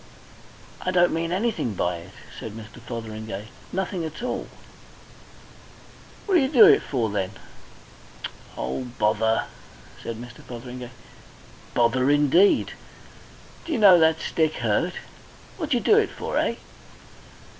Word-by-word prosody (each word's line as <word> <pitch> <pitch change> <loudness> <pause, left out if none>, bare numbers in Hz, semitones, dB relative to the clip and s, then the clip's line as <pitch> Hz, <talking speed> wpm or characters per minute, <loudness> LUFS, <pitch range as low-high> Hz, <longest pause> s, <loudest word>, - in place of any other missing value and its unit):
"I - - -2
don't 175 -1 +3
mean 165 +1 -1
anything 190 - -1
by 90 -1 0
it," 85 +3 -12 0.3
said 110 - -7
Mr. 110 +2 -11
Fotheringay. 110 -3 -6 0.2
"Nothing 185 -1 -2
at 160 +8 -6
all." 250 - -3 1.8
"What 385 -3 +3
d'yer 265 - +2
do 315 +10 +8
it 415 0 +7
for 115 -6 -1
then?" 100 -1 -2 1.2
"Oh, 130 - -3
bother!" 110 +1 +2 0.6
said 115 - -5
Mr. 120 +1 -10
Fotheringay. 125 0 -8 0.9
"Bother 125 +3 +3
indeed! 150 +7 +4 0.9
D'yer 325 -3 -1
know 195 -5 +8
that 160 0 +4
stick 160 -1 0
hurt? 120 +10 0 0.6
What 320 -6 -4
d'yer 245 -5 +2
do 425 - +5
it 425 - +1
for, - - -5
eh?" - - 0
130 Hz, 125 wpm, -24 LUFS, 110-185 Hz, 1.8 s, do